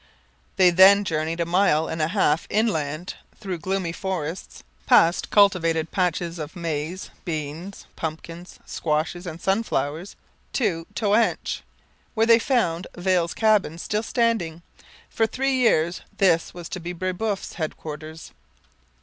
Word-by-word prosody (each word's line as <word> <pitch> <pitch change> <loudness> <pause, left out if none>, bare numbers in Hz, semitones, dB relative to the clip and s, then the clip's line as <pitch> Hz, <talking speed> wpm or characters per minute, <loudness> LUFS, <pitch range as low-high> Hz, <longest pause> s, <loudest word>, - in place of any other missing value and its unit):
They 185 -2 +5
then 195 +3 +7
journeyed 160 -2 -2
a - - +1
mile 170 -3 +2
and 160 - -3
a 155 - +2
half 165 -4 +1
inland, 175 -6 -1 0.3
through 190 -5 -4
gloomy 185 0 -2
forests, 175 -2 -5 0.2
past 170 +2 +4
cultivated 165 -6 +3
patches 175 -2 -1
of 155 +3 -6
maize, 165 +1 -4
beans, 160 +3 -5
pumpkins, 165 +2 -7
squashes, 160 +3 -2
and 165 -1 -6
sunflowers, 180 -4 -1 0.4
to 175 -10 -1
Toanche, 220 +1 +1 0.5
where 225 0 +3
they 230 0 +6
found 190 -10 0
Viel's 180 -1 0
cabin 215 -7 +2
still 210 +5 -2
standing. 220 -9 -1 0.4
For 225 - 0
three 270 +4 -1
years 180 -9 +2 0.2
this 170 -4 +3
was 175 -2 -8
to 185 - -5
be 175 +1 -5
Brebeuf's 185 +3 -3
headquarters. 155 -1 -6
175 Hz, 125 wpm, -24 LUFS, 160-200 Hz, 0.5 s, then